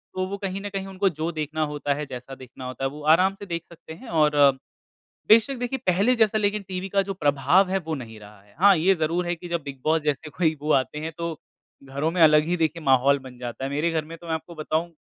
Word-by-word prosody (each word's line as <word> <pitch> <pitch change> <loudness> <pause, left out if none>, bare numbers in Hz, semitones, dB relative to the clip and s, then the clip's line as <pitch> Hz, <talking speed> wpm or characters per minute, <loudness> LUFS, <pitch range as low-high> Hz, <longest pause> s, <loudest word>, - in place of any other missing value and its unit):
तो 185 0 -1
वो 200 +1 -5
कहीं 195 0 -4
न 205 - -5
कहीं 195 0 -3
उनको 195 0 0
जो 165 +2 -1
देखना 155 0 -2
होता 145 -1 -1
है, 150 +1 -4
जैसा 130 0 -8
देखना 130 0 -11
होता 130 +1 -6
है, 135 - +1
वो 150 +2 -10
आराम 190 +2 +2
से 205 - -7
देख 170 -2 -4
सकते 165 -1 -12
हैं 235 +9 -13
और 150 -2 +2
अ, 140 -1 +7 0.8
बेशक 230 +5 +5
देखिए 250 +2 -2
पहले 200 +8 +3
जैसा 220 -1 +3
लेकिन 205 0 0
टीवी 185 +1 -4
का 195 +1 +2
जो 195 0 -5
प्रभाव 150 +4 +3
है 195 - +1
वो 160 - -1
नहीं 115 -5 -8
रहा 105 -1 -14
है। 100 0 -25
हाँ, 200 -1 +7
ये 185 +5 +3
ज़रूर 170 +2 -1
है 175 - 0
कि 175 +1 -10
जब 170 -2 -2
बिग 135 -2 -8
बॉस 160 0 +2
जैसे 150 +1 -2
कोई 160 -2 +1
वो 150 +1 0
आते 150 - -9
हैं 160 +1 -5
तो 170 -2 -4 0.5
घरों 140 +4 -2
में 175 0 -2
अलग 150 -1 +6
ही 175 +2 0
देखिए 165 0 -1
माहौल 135 +1 +4
बन 125 -1 -11
जाता 125 +1 -6
है। 135 - -3
मेरे 150 +4 0
घर 160 -2 -1
में 165 +2 -9
तो 170 - -13
मैं 160 - -1
आपको 170 +2 -7
बताऊँ 160 +2 -2
160 Hz, 265 wpm, -24 LUFS, 145-185 Hz, 0.8 s, अ